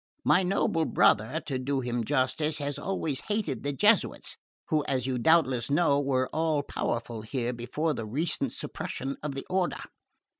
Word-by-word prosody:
My 185 Hz, -, +5 dB
noble 180 Hz, -3 st, +1 dB
brother, 110 Hz, +7 st, +3 dB
to 130 Hz, -3 st, -2 dB
do 135 Hz, +1 st, -1 dB
him 120 Hz, -1 st, -2 dB
justice, 145 Hz, +4 st, +1 dB
has 145 Hz, -1 st, -2 dB
always 160 Hz, -8 st, -2 dB
hated 210 Hz, 0 st, -1 dB
the 145 Hz, -, -1 dB
Jesuits, 135 Hz, -, +2 dB, 0.3 s
who, 155 Hz, -2 st, +2 dB
as 130 Hz, -2 st, 0 dB
you 130 Hz, -2 st, -1 dB
doubtless 130 Hz, -4 st, +3 dB
know, 145 Hz, -1 st, +3 dB
were 130 Hz, -2 st, +1 dB
all 155 Hz, -2 st, +1 dB
powerful 115 Hz, -4 st, -3 dB
here 120 Hz, +2 st, -2 dB
before 130 Hz, +7 st, -2 dB
the 115 Hz, -4 st, -5 dB
recent 150 Hz, +9 st, -1 dB
suppression 135 Hz, +1 st, -5 dB
of 145 Hz, -2 st, -4 dB
the 135 Hz, -, -5 dB
Order. 185 Hz, -1 st, 0 dB
140 Hz, 160 wpm, -28 LUFS, 125-160 Hz, 0.3 s, My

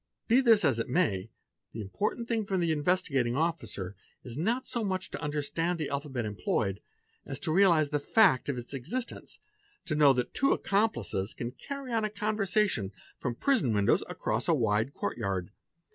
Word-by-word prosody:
Be 245 Hz, +3 st, +5 dB
this 225 Hz, -7 st, +5 dB
as 130 Hz, -6 st, +2 dB
it 115 Hz, -, -2 dB
may, 115 Hz, -, +1 dB, 0.4 s
the 115 Hz, -, -6 dB
important 210 Hz, -, -2 dB
thing 225 Hz, -4 st, -1 dB
for 195 Hz, -, 0 dB
the 170 Hz, -2 st, +1 dB
Investigating 145 Hz, -6 st, +1 dB
Officer 140 Hz, -, -2 dB, 0.3 s
is 120 Hz, -2 st, -7 dB
not 225 Hz, -, 0 dB
so 235 Hz, -, -2 dB
much 190 Hz, -2 st, -2 dB
to -, -, -5 dB
understand 155 Hz, +3 st, -1 dB
the 155 Hz, -3 st, -3 dB
alphabet 140 Hz, -4 st, -3 dB
employed, 100 Hz, -1 st, -1 dB, 0.4 s
as -, -, -4 dB
to -, -, -1 dB
realize 170 Hz, -5 st, +5 dB
the 145 Hz, 0 st, 0 dB
fact 165 Hz, -, +4 dB
of 135 Hz, -, -1 dB
its 120 Hz, +3 st, -8 dB
existence, 170 Hz, -, -5 dB, 0.5 s
to 160 Hz, -, -2 dB
know 150 Hz, -2 st, +6 dB
that 125 Hz, -1 st, -2 dB
two 275 Hz, -, +3 dB
accomplices 200 Hz, -, 0 dB
can 120 Hz, 0 st, -4 dB
carry 275 Hz, -, -7 dB
on 225 Hz, -1 st, +1 dB
a 215 Hz, -, 0 dB
conversation 210 Hz, -, 0 dB, 0.3 s
from 125 Hz, -, -2 dB
the -, -, -20 dB
prison 240 Hz, -, +3 dB
windows 100 Hz, -1 st, +3 dB
across -, -, -2 dB
a -, -, +4 dB
wide 110 Hz, +6 st, +1 dB
courtyard. 95 Hz, -2 st, -2 dB
155 Hz, 175 wpm, -30 LUFS, -, 0.5 s, know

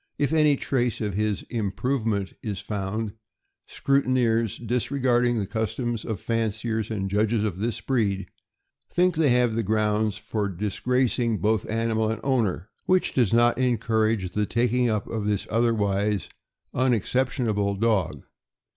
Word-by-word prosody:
If 145 Hz, +1 st, 0 dB
any 150 Hz, -2 st, +4 dB
trace 125 Hz, -3 st, -1 dB
of 105 Hz, -3 st, -2 dB
his 105 Hz, 0 st, -1 dB
' -, -, -21 dB
' -, -, -40 dB
improvement 110 Hz, -1 st, -1 dB
' -, -, -49 dB
' -, -, -54 dB
is 95 Hz, -, -5 dB
found, 105 Hz, +1 st, -3 dB, 0.5 s
scrutineers, 120 Hz, -5 st, +1 dB
disregarding 120 Hz, 0 st, +1 dB
the 105 Hz, -, -1 dB
customs 110 Hz, +2 st, -2 dB
of 110 Hz, -5 st, -3 dB
fanciers 110 Hz, 0 st, -1 dB
and 100 Hz, -3 st, -2 dB
judges 105 Hz, +2 st, +1 dB
of 100 Hz, -5 st, -2 dB
this 115 Hz, +4 st, -2 dB
breed, 105 Hz, -7 st, 0 dB, 0.7 s
think 180 Hz, 0 st, +2 dB
they 155 Hz, -2 st, +3 dB
have 120 Hz, -2 st, +2 dB
grounds 105 Hz, 0 st, +1 dB
for 105 Hz, -2 st, -2 dB
dis 100 Hz, +2 st, -4 dB
gracing 125 Hz, -2 st, +1 dB
both 105 Hz, +2 st, 0 dB
animal 110 Hz, 0 st, 0 dB
and 110 Hz, -, -2 dB
owner, 110 Hz, -8 st, 0 dB, 0.2 s
which 185 Hz, 0 st, +2 dB
does 120 Hz, -7 st, +2 dB
not 120 Hz, +1 st, +4 dB
encourage 110 Hz, -5 st, +1 dB
the 105 Hz, -1 st, 0 dB
taking 125 Hz, +1 st, +1 dB
up 105 Hz, -3 st, -1 dB
of 110 Hz, -2 st, -3 dB
this 105 Hz, -2 st, 0 dB
otherwise 105 Hz, -4 st, +1 dB, 0.4 s
unexceptionable 120 Hz, -4 st, +1 dB
dog. 105 Hz, -4 st, 0 dB
110 Hz, 145 wpm, -25 LUFS, 105-120 Hz, 0.7 s, any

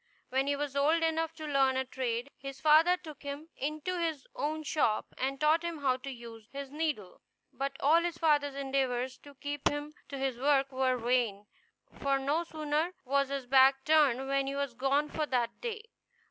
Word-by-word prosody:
When 265 Hz, +2 st, +1 dB
he 285 Hz, -, +2 dB
was 285 Hz, -1 st, -3 dB
old 310 Hz, +4 st, +3 dB
enough 325 Hz, 0 st, +1 dB
to 315 Hz, -, -7 dB
learn 270 Hz, -3 st, +2 dB
a 265 Hz, -, 0 dB
trade, 250 Hz, 0 st, -3 dB
his 275 Hz, 0 st, -8 dB
father 315 Hz, +5 st, +5 dB
took 310 Hz, -5 st, -11 dB
him 285 Hz, +3 st, -6 dB
into 310 Hz, +6 st, -3 dB
his 320 Hz, -5 st, -2 dB
own 310 Hz, +2 st, -2 dB
shop, 280 Hz, -8 st, +1 dB
and 270 Hz, +1 st, -2 dB
taught 310 Hz, +2 st, +4 dB
him 340 Hz, -3 st, -4 dB
how 260 Hz, -2 st, +2 dB
to 270 Hz, +2 st, -7 dB
use 235 Hz, -3 st, -10 dB
his 275 Hz, -1 st, -6 dB
needle; 295 Hz, -, -3 dB, 0.3 s
but 275 Hz, 0 st, -2 dB
all 315 Hz, +4 st, +5 dB
his 340 Hz, -1 st, -2 dB
father's 290 Hz, -4 st, +2 dB
endeavors 265 Hz, -2 st, -1 dB
to 285 Hz, -1 st, -15 dB
keep 285 Hz, +1 st, -1 dB
him 290 Hz, +1 st, -5 dB, 0.2 s
to 280 Hz, -, -5 dB
his 265 Hz, -3 st, -2 dB
work 275 Hz, 0 st, +3 dB
were 260 Hz, -1 st, +1 dB
vain, 235 Hz, -4 st, 0 dB, 0.6 s
for 275 Hz, -1 st, +2 dB
no 285 Hz, +5 st, 0 dB
sooner 315 Hz, +2 st, -2 dB
was 275 Hz, +1 st, +1 dB
his 275 Hz, -2 st, -3 dB
back 265 Hz, +1 st, +5 dB
turned 285 Hz, -5 st, +4 dB
than 275 Hz, 0 st, +1 dB
he 275 Hz, -, -2 dB
was 280 Hz, -3 st, -2 dB
gone 275 Hz, +4 st, +1 dB
for 305 Hz, 0 st, -2 dB
that 240 Hz, -3 st, -1 dB
day. 450 Hz, -2 st, -4 dB
280 Hz, 190 wpm, -31 LUFS, 265-305 Hz, 0.6 s, father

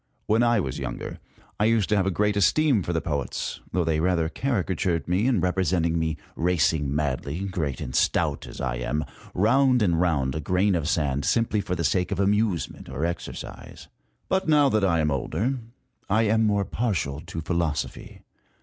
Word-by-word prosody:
When 110 Hz, +2 st, +3 dB
I 120 Hz, -1 st, +3 dB
was 65 Hz, -9 st, -3 dB
younger -, -, -5 dB, 0.4 s
I 105 Hz, -, +3 dB
used 110 Hz, -3 st, +3 dB
to 105 Hz, -, +3 dB
have 95 Hz, -2 st, +2 dB
a -, -, +3 dB
great 105 Hz, +2 st, +1 dB
esteem 125 Hz, -, +3 dB
for 90 Hz, -, -3 dB
the 80 Hz, -1 st, 0 dB
poets, 70 Hz, -5 st, -3 dB
though 90 Hz, 0 st, +1 dB
they 80 Hz, -1 st, +1 dB
rather 85 Hz, -1 st, +1 dB
caricatured 95 Hz, -, -1 dB
me 95 Hz, +7 st, +1 dB
in 120 Hz, -9 st, +2 dB
representing 90 Hz, -2 st, +1 dB
me 80 Hz, -1 st, -1 dB, 0.2 s
racing 80 Hz, -4 st, +1 dB
madly, 75 Hz, +2 st, -2 dB
great 90 Hz, -8 st, -2 dB
and 65 Hz, -, -5 dB
stout -, -, +1 dB
as -, -, -10 dB
I 65 Hz, -2 st, -2 dB
am, 75 Hz, +5 st, -2 dB, 0.3 s
round 125 Hz, +4 st, +4 dB
and 85 Hz, -4 st, +2 dB
round 70 Hz, -7 st, +1 dB
a 80 Hz, -, -3 dB
grain 90 Hz, +6 st, +2 dB
of 80 Hz, -3 st, 0 dB
sand, 70 Hz, -4 st, 0 dB
simply 115 Hz, -3 st, +1 dB
for 95 Hz, -2 st, -3 dB
the 85 Hz, -, -2 dB
sake 90 Hz, +5 st, +1 dB
of 100 Hz, -, -2 dB
amusement 100 Hz, -6 st, 0 dB
or 70 Hz, +4 st, -2 dB
exercise. 85 Hz, 0 st, -7 dB, 0.4 s
But 190 Hz, -1 st, 0 dB
now 145 Hz, -2 st, +5 dB
that 110 Hz, -4 st, +1 dB
I 85 Hz, -4 st, +3 dB
am 75 Hz, -1 st, +1 dB
older, 115 Hz, -, -1 dB, 0.5 s
I 110 Hz, +3 st, +3 dB
am 110 Hz, +1 st, +3 dB
more 100 Hz, -2 st, +1 dB
partial 90 Hz, -, -2 dB
to 85 Hz, -1 st, -7 dB
philosophy. 85 Hz, -2 st, -3 dB
90 Hz, 185 wpm, -25 LUFS, 80-105 Hz, 0.5 s, now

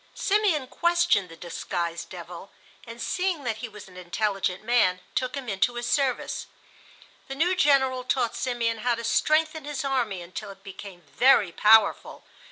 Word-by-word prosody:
Simeon 390 Hz, -9 st, +1 dB
questioned 345 Hz, -, +1 dB
the 165 Hz, -, -11 dB
disguised 170 Hz, 0 st, -4 dB
devil, 175 Hz, +1 st, -9 dB, 0.4 s
and 230 Hz, +1 st, -9 dB
seeing 360 Hz, +3 st, -1 dB
that 225 Hz, -3 st, -2 dB
he 230 Hz, +1 st, -6 dB
was 210 Hz, -2 st, -12 dB
an 180 Hz, -1 st, -15 dB
intelligent 190 Hz, +1 st, -2 dB
man 215 Hz, -6 st, +2 dB
took 255 Hz, +2 st, -2 dB
him 270 Hz, -2 st, -6 dB
into 210 Hz, +4 st, 0 dB
his 240 Hz, 0 st, -3 dB
service. 270 Hz, -1 st, -1 dB, 0.8 s
The 270 Hz, -, -6 dB
new 350 Hz, +6 st, +2 dB
General 265 Hz, -5 st, +3 dB
taught 250 Hz, -2 st, 0 dB
Simeon 235 Hz, -3 st, -1 dB
how 240 Hz, +2 st, +1 dB
to 230 Hz, -, -7 dB
strengthen 310 Hz, +6 st, +1 dB
his 290 Hz, -1 st, -4 dB
army 235 Hz, -9 st, -1 dB
until 185 Hz, +4 st, -8 dB
it 195 Hz, 0 st, -13 dB
became 195 Hz, -2 st, -10 dB
very 200 Hz, -, +3 dB
powerful. 215 Hz, +3 st, +3 dB
235 Hz, 160 wpm, -26 LUFS, 195-270 Hz, 0.8 s, General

